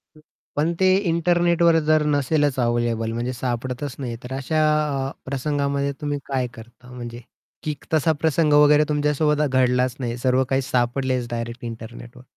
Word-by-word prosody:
हं. 155 - -18 0.3
पण 155 +4 +1
ते 185 0 +5
इंटरनेटवर 170 0 +3
जर 155 -1 +4
नसेलच 145 -1 +1
अवेलेबल 120 -2 0
म्हणजे 120 +2 -2
सापडतच 125 +2 -4
नाही 130 -3 -4
आहे, 115 - -10
तर 125 +1 -6
अशा 135 +4 -1 0.5
अ, - - -9
प्रसंगामध्ये 140 +1 -1
तुम्ही 145 -1 -2
काय 130 -2 -1
करता 120 +2 -14
म्हणजे 120 -1 -8 0.4
की 155 - -1
क - - -19
तसा 160 +1 +3
प्रसंग 160 -1 +2
वगैरे 150 0 +6
तुमच्यासोबत 150 0 +1
आ 150 - +2
घडलाच 125 -1 +2
नाहीये, 120 -2 -3
सर्व 130 +1 +2
काही 135 0 +2
सापडलेच 125 0 0
डायरेक्ट 115 +1 -5
इंटरनेटवर? 120 +2 -9
135 Hz, 160 wpm, -23 LUFS, 120-150 Hz, 0.5 s, वगैरे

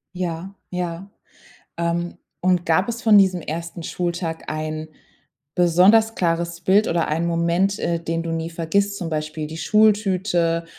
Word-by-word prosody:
Ja, 180 +2 -4
ja. 180 +1 -4 0.7
Ähm, 170 +1 -2 0.2
und 180 -1 +1
gab 170 +5 +2
es 235 +1 -4
von 220 -2 +6
diesem 190 -2 +3
1. 165 +2 -6
Schultag 170 -1 -3
ein 155 0 -4 0.7
besonders 185 +6 +4
klares 170 -1 -1
Bild 195 +4 +3
oder 170 -1 0
einen 165 +3 0
Moment, 170 +4 +1
äh, 170 -1 -1
den 165 0 -2
du 165 - -4
nie 165 0 -3
vergisst, 200 +5 0
zum 170 -2 -4
Beispiel 155 0 -3
die 160 +2 -8
Schultüte, 190 -5 +2
170 Hz, 145 wpm, -22 LUFS, 165-190 Hz, 0.7 s, von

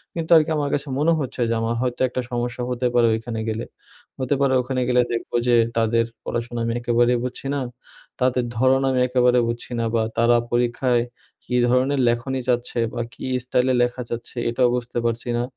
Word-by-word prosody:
কিন্তু 165 0 -4
আরকি 160 +1 +2
আমার 145 -1 -1
কাছে 145 0 -1
মনে 165 +2 +3
হচ্ছে 130 -2 -4
যে - - +1
আমার 115 +1 -1
হয়তো 125 -1 -2
একটা 125 - -2
সমস্যা 120 +1 -2
হতে 125 0 0
পারে 120 -1 +5
ওইখানে 110 0 -3
গেলে। 110 +2 -3 0.5
হতে 130 +2 0
পারে 135 -1 +3
ওখানে 130 0 -2
গেলে 125 0 +4
দেখবো 115 - -4
যে 120 - +5 0.2
তাদের 115 +1 +2 0.2
পড়াশোনা 120 0 -3
আমি 115 - -1
একেবারেই 120 +1 +2
বুঝছি 125 +2 -5
না, - - 0 0.6
তাদের 125 -1 +2
ধরণ 130 +2 +3
আমি 130 - +1
একেবারে 125 -1 +3
বুঝছি 120 +1 -4
না, - - 0
বা 115 - +3 0.2
তারা 120 +1 +4
পরীক্ষায় 120 0 +1 0.4
কী 125 - -2
ধরনের 130 +2 +2
লেখনি 130 +3 -1
চাচ্ছে 120 -1 0
বা 120 - -2
কী - - -8 0.2
স্টাইলে 125 0 +1
লেখা 120 +1 -2
যাচ্ছে, 120 +1 -6
এটাও 125 +1 +2
বুঝতে 120 -1 -4
পারছি 115 +1 -2
না। 120 - 0
125 Hz, 190 wpm, -22 LUFS, 120-130 Hz, 0.6 s, পারে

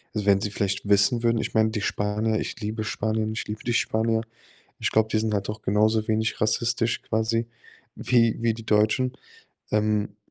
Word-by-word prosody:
wenn 100 -2 +3
sie 105 0 -3
vielleicht 100 0 -2
wissen 100 +4 +3
würden 115 -1 +2
ich - - -4
meine, 110 0 +3
die 105 -2 -3
Spanier, 105 +2 0
ich - - -5
liebe 110 +1 -3
Spanien, 110 0 -1
ich 115 - -4
liebe 105 +1 -6
die 120 - -1
Spanier. 110 0 +1 0.6
Ich - - -1
glaube, 110 0 +2
die 110 - +2
sind 110 -1 -1
halt 100 -1 -1
doch 105 0 -5
genauso 110 +2 +2
wenig 110 0 0
rassistisch 115 +2 0
quasi 115 +1 -1 0.5
wie 115 -2 +2
wie 115 -1 +2
die 115 0 -10
Deutschen. 110 +5 +2 0.6
Ähm, 105 -1 0
110 Hz, 180 wpm, -25 LUFS, 105-115 Hz, 0.6 s, wenn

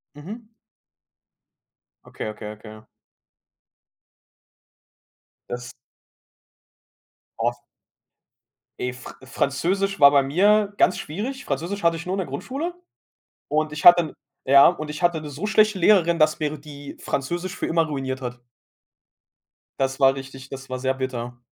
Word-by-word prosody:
Mhm. 215 +10 -9 1.6
Okay, - - -7
okay, 105 0 -7
okay. 110 0 -12 2.6
Das 120 0 -6 1.7
Oh. - - 0 1.2
Ey, 125 - -2
Fr 125 - -11
Französisch 185 +9 -1
war 140 0 +9
bei 140 -1 +5
mir 200 +8 +3
ganz 180 - +3
schwierig. 225 - -5
Französisch 170 +8 -3
hatte 170 0 +3
ich 165 +2 -7
nur 185 - -2
in - - -4
der 185 - -2
Grundschule 275 - -4 0.8
und 155 0 0
ich 150 - -6
hatte 175 0 +10
'n 155 - -7 0.3
ja, 140 +1 +8
und 155 -3 -1
ich 150 - -6
hatte 175 -2 +2
'ne 150 - -7
so 145 +8 -5
schlechte 215 -1 +3
Lehrerin, 170 -3 +4
dass 155 +1 +3
mir 155 -1 -2
die 145 -1 -10
Französisch 175 +7 -3
für - - -3
immer 165 0 +2
ruiniert 135 -3 -4
hat. 125 -1 -6 1.4
Das 135 0 -1
war 135 -1 +5
richtig 135 -1 -9
das 135 0 -9
war 130 0 -4
sehr 130 +1 0
bitter. 125 -2 -5
150 Hz, 135 wpm, -23 LUFS, 135-180 Hz, 2.6 s, hatte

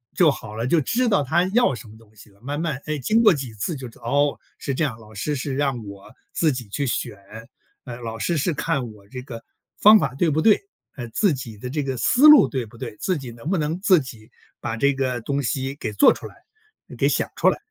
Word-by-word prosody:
就 175 -4 +5
好 110 -5 -8
了， 115 +2 -2
就 160 +4 +3
知 245 - 0
道 200 -9 +2
他 165 +6 +2
要 240 - +3
什 110 0 -11
么 110 +1 -14
东 110 -1 -21
西 105 - -16
了。 100 0 -25
慢 145 +4 -4
慢， 155 -4 -3
哎， 155 -1 -2
经 220 - +2
过 215 -4 +6
几 135 -6 -5
次 110 +10 -3
就 130 -3 -7
知 115 - -16
道， - - -15
哦， 145 +4 +1 0.2
是 140 - -3
这 160 - -1
样， 125 -7 -2
老 110 -1 -16
师 145 +8 -2
是 135 0 -3
让 135 -4 -1
我 100 -1 -12 0.2
自 160 -2 +2
己 125 -4 -6
去 140 +8 -3
选， 110 -3 -3 0.7
呃， 120 - -7
老 115 -1 -5
师 170 -2 0
是 165 +4 0
看 140 -6 -2
我 100 -2 -18
这 125 +3 -8
个 120 -3 -9 0.4
方 215 +1 +8
法 140 - -1
对 165 +4 +2
不 155 +1 +1
对， 215 +2 +5 0.4
呃， 120 -3 -6
自 200 - +2
己 120 -5 -7
的 125 +5 -7
这 150 +2 -2
个 135 -1 -3
思 255 - +4
路 300 -1 +9
对 130 -4 -3
不 115 +2 -16
对， 115 -3 -7
自 185 -2 -1
己 130 -4 -8
能 115 +7 -8
不 190 - +1
能 155 +2 -2
自 190 -2 +5
己 115 -5 -11 0.3
把 115 -1 -4
这 140 +5 +2
个 130 -3 -2
东 140 +4 -2
西 135 +1 -2
给 110 -6 -5
做 100 - +6
出 - - -6
来、 - - -10 0.6
给 - - +2
想 - - 0
出 - - +2
来， - - -1
135 Hz, 270 characters per minute, -23 LUFS, 115-155 Hz, 0.7 s, 路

